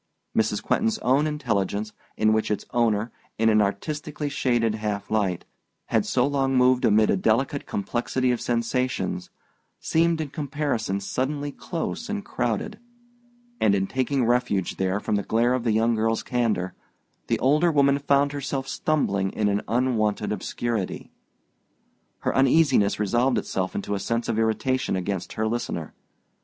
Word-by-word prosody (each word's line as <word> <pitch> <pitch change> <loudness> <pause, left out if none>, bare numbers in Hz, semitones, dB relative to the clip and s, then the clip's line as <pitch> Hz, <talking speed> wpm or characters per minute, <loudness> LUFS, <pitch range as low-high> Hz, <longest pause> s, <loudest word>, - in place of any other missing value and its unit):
Mrs. 105 -1 +1
Quentin's 225 0 +1
own 140 +4 +3
intelligence, 105 -8 -1 0.2
in 110 0 +3
which 110 0 0
its 105 - -2
owner, 115 -1 +1 0.3
in 115 0 +3
an 110 -1 +4
artistically 145 +8 -2
shaded 120 -5 +1
half 105 -2 -3
light, 100 -5 0 0.4
had - - +1
so 125 -1 +2
long 135 -2 +1
moved 125 0 +4
amid 110 0 +4
a - - +3
delicate 115 +8 0
complexity 125 +4 -1
of 120 - -1
sensations, 115 -6 -1 0.5
seemed 165 0 +2
in 155 -2 -3
comparison 140 -8 -2
suddenly 145 +7 -2
close 175 - -5
and 205 -1 -3
crowded; 120 - -2 0.8
and 100 -2 +4
in 95 -1 +1
taking 130 +3 0
refuge 120 -6 0
there 95 +1 0
from 105 - -1
the - - 0
glare 115 +4 +2
of 130 -2 -1
the 115 - +1
young 115 +2 +2
girl's 115 0 0
candor, 110 -7 0 0.5
the - - +1
older 150 +6 +3
woman 140 -2 +3
found 140 0 +2
herself 140 -1 -3
stumbling 100 -14 0
in 105 - 0
an 100 0 +1
unwonted 110 -3 0
obscurity. 105 0 -3 1.1
Her - - -1
uneasiness 135 -7 +4
resolved 120 +4 +2
itself 95 -1 -2
into 100 +1 -3
a 100 - -1
sense 115 +3 -2
of 115 -1 0
irritation 120 +2 0
against 95 0 -3
her 110 - -1
listener. 120 +2 -3
120 Hz, 150 wpm, -25 LUFS, 105-135 Hz, 1.1 s, an